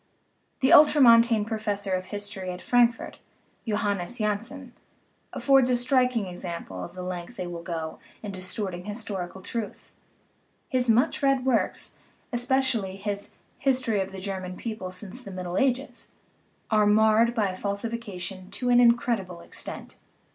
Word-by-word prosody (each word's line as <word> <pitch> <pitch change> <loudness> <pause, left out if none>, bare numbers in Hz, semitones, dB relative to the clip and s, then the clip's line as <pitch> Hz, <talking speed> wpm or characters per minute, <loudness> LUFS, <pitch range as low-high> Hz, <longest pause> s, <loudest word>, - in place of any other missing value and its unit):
The 270 +5 +5
ultra 300 -1 +8
montane 230 -3 +6
professor 210 -3 -2
of 185 0 -1
history 205 -2 -5
at 180 0 -5
Frankfurt, 240 +3 +2 0.5
Johannes 210 0 -1
Janssen, 235 +5 -3 0.6
affords 270 -2 +4
a 250 - +4
striking 250 -2 +2
example 170 - -6
of 175 - -9
the 180 - -6
length 180 +4 -6
they 185 - -4
will 175 -1 -6
go 165 -2 -5 0.2
in 205 - -4
distorting 185 -1 -3
historical 195 -4 -5
truth; 225 -1 -6 0.7
his 250 -2 0
much 245 +9 +3
read 275 -2 +2
works 255 -4 0 0.4
(especially 245 -5 +1
his 200 0 -4 0.2
History 255 -6 +1
of 190 0 -4
the 195 - -8
German 185 -1 -5
People 215 -5 -5
since 190 +6 -7
the 205 - -10
Middle 180 -2 -5
Ages) 270 0 -1 0.6
are 215 -1 +4
marred 220 +2 +4
by 205 -5 +1
falsification 200 -2 -5
to 250 - -1
an 245 - +6
incredible 235 -7 +2
extent. - - -9
210 Hz, 140 wpm, -26 LUFS, 185-245 Hz, 0.7 s, ultra